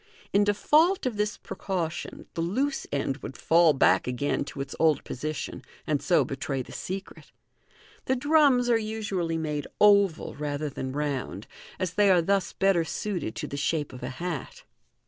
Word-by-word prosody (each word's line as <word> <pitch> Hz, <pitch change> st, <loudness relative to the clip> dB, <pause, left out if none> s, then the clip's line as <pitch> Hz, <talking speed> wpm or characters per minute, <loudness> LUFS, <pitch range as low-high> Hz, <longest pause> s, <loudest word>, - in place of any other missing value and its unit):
In 200 Hz, -, +5 dB
default 305 Hz, -, +3 dB
of 250 Hz, -4 st, -1 dB
this 210 Hz, 0 st, -1 dB
precaution, 170 Hz, -4 st, -4 dB
the 165 Hz, -, -2 dB
loose 260 Hz, +12 st, -1 dB
end 140 Hz, -1 st, -1 dB
would -, -, -8 dB
fall 165 Hz, 0 st, +5 dB
back 135 Hz, -, +3 dB
again 125 Hz, +4 st, -1 dB
to 140 Hz, -, -9 dB
its 135 Hz, 0 st, -4 dB
old 160 Hz, -2 st, +3 dB
position, 155 Hz, +4 st, -5 dB, 0.2 s
and 150 Hz, -2 st, 0 dB
so 170 Hz, -7 st, +3 dB
betray 135 Hz, 0 st, -3 dB
the -, -, -13 dB
secret. 190 Hz, +1 st, -7 dB, 0.7 s
The 260 Hz, -, +1 dB
drums 280 Hz, -2 st, +4 dB
are 235 Hz, -2 st, +4 dB
usually 205 Hz, -6 st, -2 dB
made 150 Hz, -2 st, -3 dB
oval, 200 Hz, -5 st, +4 dB
rather 150 Hz, 0 st, -3 dB
than 130 Hz, 0 st, -4 dB
round, 135 Hz, -8 st, -3 dB, 0.3 s
as 185 Hz, -2 st, -2 dB
they 205 Hz, +2 st, +4 dB
are 185 Hz, -2 st, +6 dB
thus 195 Hz, +2 st, +1 dB
better 195 Hz, -3 st, +2 dB
suited 175 Hz, -, -3 dB
to -, -, -4 dB
the 140 Hz, -, -5 dB
shape 145 Hz, -1 st, -1 dB
of 125 Hz, -, -9 dB
a -, -, -4 dB
hat. 160 Hz, +2 st, -5 dB
170 Hz, 165 wpm, -27 LUFS, 145-205 Hz, 0.7 s, are